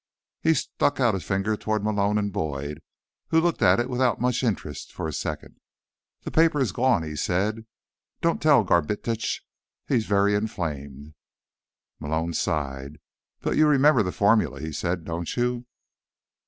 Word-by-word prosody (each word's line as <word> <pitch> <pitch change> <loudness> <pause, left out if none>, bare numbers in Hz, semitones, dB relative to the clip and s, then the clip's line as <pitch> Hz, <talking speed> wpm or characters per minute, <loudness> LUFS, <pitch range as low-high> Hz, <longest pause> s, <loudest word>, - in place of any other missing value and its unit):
He 160 0 +3
stuck 145 +1 0
out 120 -4 +3
a 95 - -1
finger 95 +6 -1
toward 110 0 -2
Malone 105 -1 +1
and 100 -1 -1
Boyd, 75 -5 -4 0.5
who 160 - +3
looked 170 -3 0
at 95 -1 +5
it 120 - 0
without 125 -1 +1
much 125 0 +1
interest 95 - -3
for - - -4
a 80 - -5
second. - - -5 0.6
"The - - -5
paper 160 -2 +3
is 130 -8 +1
gone," 120 -5 +2
he 75 -1 -6
said. 105 +8 -1 0.5
"Don't 170 -1 0
tell 145 -6 +5
Garbitsch. 105 +6 0 0.4
He 135 - +1
is 110 - -1
very 100 0 +3
inflamed." 75 -9 -4 0.9
Malone 80 +3 -2
sighed. 70 -2 -2 0.4
"But - - -1
you 155 - +5
remember 150 -1 +5
the 90 -3 -1
formula," 105 +3 +2
he 80 0 -5
said. 85 +2 -2
"Don't 85 +4 -4
you?" 120 0 -1
105 Hz, 155 wpm, -25 LUFS, 80-125 Hz, 0.9 s, at